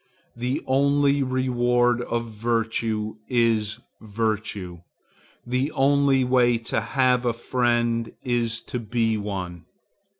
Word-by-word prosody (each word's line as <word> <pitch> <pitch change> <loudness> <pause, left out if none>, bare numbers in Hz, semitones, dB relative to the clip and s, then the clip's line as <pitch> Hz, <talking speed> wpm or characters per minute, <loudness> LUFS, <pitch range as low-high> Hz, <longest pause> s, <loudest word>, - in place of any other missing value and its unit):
The 125 +2 -2
only 140 +1 +2
reward 125 -2 +1
of 115 -1 -3
virtue 110 -1 -1
is 115 -3 +1 0.2
virtue; 105 -4 -3 0.7
the 125 +4 -1
only 140 -1 +3
way 125 -1 +3
to 115 -1 -2
have 125 +2 +1
a 120 -1 +1
friend 120 -1 0
is 120 -2 0
to 125 - -5
be 115 0 0
one. 95 -4 -5
120 Hz, 105 wpm, -24 LUFS, 110-125 Hz, 0.7 s, only